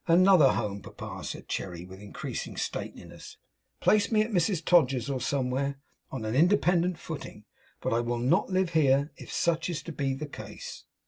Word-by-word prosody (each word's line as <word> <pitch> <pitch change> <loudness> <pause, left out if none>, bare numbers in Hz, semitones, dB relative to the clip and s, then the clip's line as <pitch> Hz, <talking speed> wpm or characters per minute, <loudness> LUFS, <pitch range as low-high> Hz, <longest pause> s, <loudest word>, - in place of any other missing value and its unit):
'Another 175 -3 +6
home, 100 -1 -2
papa,' - - -8
said - - -6
Cherry, 90 -2 -4
with 95 +1 -11
increasing 105 - -6
stateliness - - -6 0.4
'Place 210 +1 +3
me 215 -1 +4
at 220 - -5
Mrs 180 -3 +1
Todgers's 135 -7 +3
or 130 -2 -2
somewhere, 140 +1 -1 0.3
on 130 -5 -5
an 110 - -2
independent 175 +2 +3
footing; 145 -10 -8 0.4
but - - 0
I 115 - +2
will 120 0 -1
not 125 +8 +2
live 185 -2 +1
here, 140 -2 +3
if - - -10
such 170 0 0
is 170 -4 -3
to 170 - -6
be 140 -3 -1
the 150 +3 -5
case. 145 - -9
145 Hz, 175 wpm, -28 LUFS, 125-175 Hz, 0.4 s, Another